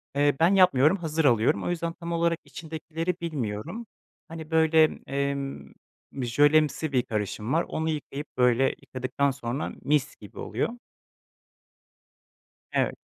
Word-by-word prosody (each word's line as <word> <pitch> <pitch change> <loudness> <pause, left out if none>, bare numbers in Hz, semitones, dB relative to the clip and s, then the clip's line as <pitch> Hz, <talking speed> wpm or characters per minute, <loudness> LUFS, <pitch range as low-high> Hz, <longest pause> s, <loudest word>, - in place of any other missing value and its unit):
Eee, 145 0 +3
ben 170 +4 +5
yapmıyorum, 180 -3 +5
hazır 160 -3 -1
alıyorum, 115 -5 +3
o - - -2
yüzden 170 -1 -2
tam 170 0 -7
olarak 170 0 +1
içindekileri 165 +2 -4
bilmiyorum. 155 - -4 0.4
Hani, 160 -1 -9
böyle, 160 0 +5 0.2
emm, 140 0 -3 0.4
bir 135 -2 -4
jölemsi 145 +4 +3
bir 125 -3 +2
karışım 105 0 -3
var, 165 - +2
onu 160 +1 -2
yıkayıp 150 -1 -4
böyle 125 0 +4 0.2
yıkadıktan 130 +2 -1
sonra 130 +1 -4
mis 140 -1 +1
gibi 105 - -13
oluyor. 180 - -2 1.9
Evet. - - 0
150 Hz, 130 wpm, -27 LUFS, 130-165 Hz, 1.9 s, ben